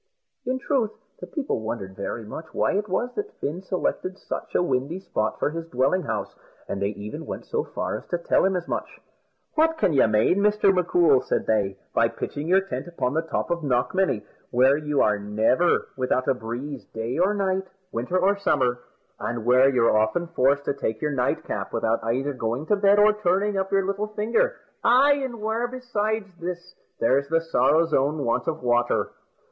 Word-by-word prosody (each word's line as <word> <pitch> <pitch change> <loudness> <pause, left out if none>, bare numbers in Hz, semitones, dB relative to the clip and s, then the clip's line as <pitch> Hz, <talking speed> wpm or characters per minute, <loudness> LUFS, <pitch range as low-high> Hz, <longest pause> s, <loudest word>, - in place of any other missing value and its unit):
In 260 +1 0
truth, 260 -4 0 0.3
the - - -8
people 295 - -2
wondered 105 -4 -5
very 110 +3 -5
much 160 +9 -7
why - - +2
it 205 +1 -1
was 240 +7 -1
that 420 0 -5
Fin 160 +6 -3
selected 185 0 -2
such - - -6
a - - +4
windy 150 +2 -1
spot 110 - -2
for - - 0
his 165 +1 -5
dwelling 135 +6 +1
house, 160 - -3 0.3
and 100 - -4
they 100 - +2
even 105 +1 -6
went - - -6
so - - -1
far - - -4
as - - -12
to 175 - -1
tell 170 - +2
him 190 0 +2
as 175 -1 -3
much. - - -4 0.5
"What 320 +1 +3
can 180 - +2
you 135 - +5
mane, 110 - +3
Mr. 205 -1 +4
M'Coul," 175 -6 +4
said - - -1
they, 100 -3 +1 0.2
"by - - +4
pitching 145 +2 -5
your 190 +2 +4
tent 195 -2 -5
upon 145 -7 -2
the 160 - +1
top 165 +1 -3
of 170 0 0
Knockmany, 130 - +1 0.2
where 130 +3 +4
you 150 -1 +1
never 110 +11 +2
are - - +1
without 130 -1 0
a - - +4
breeze, 125 +2 -6
day 115 +8 -4
or 195 +4 +3
night, 190 -1 0 0.2
winter 125 +11 -1
or 190 +2 +3
summer, 130 -11 +1 0.4
and 115 -1 -3
where 130 +2 +6
you're 120 -5 +3
often 110 +11 +1
forced 140 0 +2
to - - 0
take 110 -5 -3
your 150 - -1
nightcap 125 -3 -2
without 115 0 0
either 130 +5 -1
going 120 +3 -2
to 210 - +3
bed 200 0 +4
or 210 +1 +6
turning 205 0 +1
up 190 0 -1
your 195 -1 +2
little 200 +2 -1
finger; 230 - 0 0.3
ay, 260 +4 +6
an' 240 -3 -5
where, 220 +3 0
besides 220 -4 -2
this, 175 +1 -6 0.3
there's 135 +4 +2
the 165 +1 +3
sorrow's 165 0 +2
own 145 +2 +1
want 115 - 0
of 160 -4 -2
water?" 120 0 +1
165 Hz, 195 wpm, -25 LUFS, 125-195 Hz, 0.5 s, where